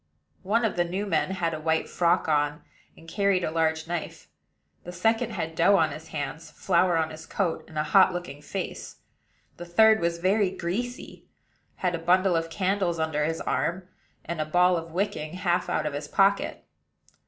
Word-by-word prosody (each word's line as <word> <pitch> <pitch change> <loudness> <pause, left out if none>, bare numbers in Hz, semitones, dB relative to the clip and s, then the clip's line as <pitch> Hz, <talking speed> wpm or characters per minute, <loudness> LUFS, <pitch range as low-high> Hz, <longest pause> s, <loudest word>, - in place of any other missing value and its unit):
One 225 +5 +1
of 210 - -2
the 175 - +3
new 185 +4 -3
men 175 -3 0
had 175 -3 -1
a 155 - -4
white 160 +1 0
frock 175 0 +1
on, 150 0 0 0.3
and 165 - -16
carried 200 0 +1
a - - -1
large 160 0 0
knife; 170 -1 -5 0.5
the 175 - -7
second 225 +6 +1
had 165 -5 -3
dough 175 +5 +4
on - - +3
his 160 +1 -9
hands, 150 +1 -5
flour 175 +1 +1
on 160 -1 0
his 155 0 -10
coat, 180 -5 -1
and 155 - -10
a 150 - +1
hot 190 +4 +5
looking 175 -5 -6
face; - - -6 0.6
the 175 - -7
third 220 +5 +5
was 170 0 0
very 190 +3 +2
greasy, 205 +8 -5 0.5
had 180 -1 -1
a 170 - -2
bundle 180 +2 +3
of 165 0 -1
candles 185 -1 0
under 160 -2 -1
his 165 +1 -2
arm, 180 +2 -2 0.4
and 165 -1 -3
a - - -1
ball 180 +3 +3
of 165 -1 -4
wicking 165 -3 -3
half 180 -1 0
out 155 - 0
of 150 - -2
his 145 +1 -5
pocket. 195 +5 +1
170 Hz, 190 wpm, -26 LUFS, 160-190 Hz, 0.6 s, hot